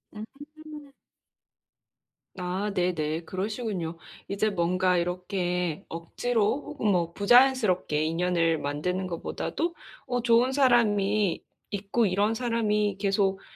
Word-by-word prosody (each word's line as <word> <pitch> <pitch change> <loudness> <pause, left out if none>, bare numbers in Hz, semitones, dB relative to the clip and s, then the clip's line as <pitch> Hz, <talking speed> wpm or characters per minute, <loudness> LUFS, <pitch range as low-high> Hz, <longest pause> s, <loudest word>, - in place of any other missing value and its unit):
음. 290 +5 -11 1.5
아, 185 +3 -2
네네. 165 -3 -1
그러시군요. 190 -3 -3 0.3
이제 205 +2 +1
뭔가 185 -1 +1
이렇게 180 -1 -2
억지로 220 - -1
혹은 280 -7 -4
뭐 175 -4 +1
부자연스럽게 210 - +3
인연을 165 0 +1
만드는 180 +7 -2
것보다도 315 - -3 0.3
"어, 245 -1 -1
좋은 240 +2 +3
사람이 215 -7 +2 0.3
있고 205 +3 0
이런 205 +3 +1
사람이 215 -4 0
계속 195 -1 +1
200 Hz, 235 characters per minute, -27 LUFS, 180-230 Hz, 1.5 s, 부자연스럽게